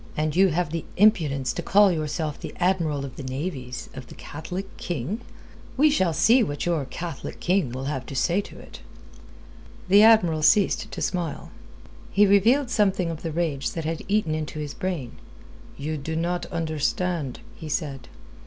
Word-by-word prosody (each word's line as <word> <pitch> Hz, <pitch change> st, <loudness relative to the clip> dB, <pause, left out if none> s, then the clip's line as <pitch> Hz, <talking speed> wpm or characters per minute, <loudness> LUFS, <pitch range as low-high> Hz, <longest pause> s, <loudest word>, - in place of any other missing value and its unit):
"And 155 Hz, 0 st, 0 dB
you 190 Hz, +2 st, +6 dB
have 175 Hz, -2 st, -1 dB
the 165 Hz, -1 st, -3 dB
impudence 160 Hz, -, +3 dB
to -, -, -3 dB
call 205 Hz, 0 st, +5 dB
yourself 155 Hz, -2 st, -2 dB
the -, -, -8 dB
Admiral 165 Hz, -6 st, +1 dB
of 130 Hz, -2 st, -10 dB
the -, -, -6 dB
Navies 130 Hz, -1 st, -5 dB
of 130 Hz, -1 st, -9 dB
the -, -, -12 dB
Catholic 180 Hz, +6 st, -7 dB
King? 175 Hz, -, -3 dB, 0.6 s
We 300 Hz, +3 st, +5 dB
shall 190 Hz, -, +2 dB
see 230 Hz, +10 st, +4 dB
what 145 Hz, -10 st, -2 dB
your 165 Hz, -5 st, 0 dB
Catholic 165 Hz, +3 st, -6 dB
King 180 Hz, -6 st, +1 dB
will 130 Hz, +2 st, -5 dB
have 135 Hz, -2 st, -3 dB
to 135 Hz, -, -7 dB
say 175 Hz, +8 st, +2 dB
to -, -, -13 dB
it." -, -, -12 dB, 1.1 s
The 200 Hz, +2 st, +7 dB
Admiral 210 Hz, -8 st, +5 dB
ceased 195 Hz, +5 st, +3 dB
to -, -, -6 dB
smile. 170 Hz, -5 st, -3 dB, 0.6 s
He 205 Hz, +2 st, +4 dB
revealed 235 Hz, +7 st, +4 dB
something 195 Hz, -6 st, +2 dB
of 160 Hz, -, -7 dB
the 165 Hz, -, -3 dB
rage 155 Hz, -4 st, -1 dB
that 165 Hz, -2 st, -4 dB
had 165 Hz, 0 st, -2 dB
eaten 200 Hz, -6 st, +1 dB
into 155 Hz, 0 st, -4 dB
his 150 Hz, -2 st, -4 dB
brain. 170 Hz, -10 st, -4 dB, 0.6 s
"You 155 Hz, +2 st, -3 dB
do 160 Hz, +3 st, -4 dB
not 175 Hz, +2 st, -1 dB
understand," 160 Hz, -2 st, -2 dB
he 160 Hz, -, -8 dB
said. 140 Hz, -5 st, -3 dB
165 Hz, 170 wpm, -25 LUFS, 145-190 Hz, 1.1 s, The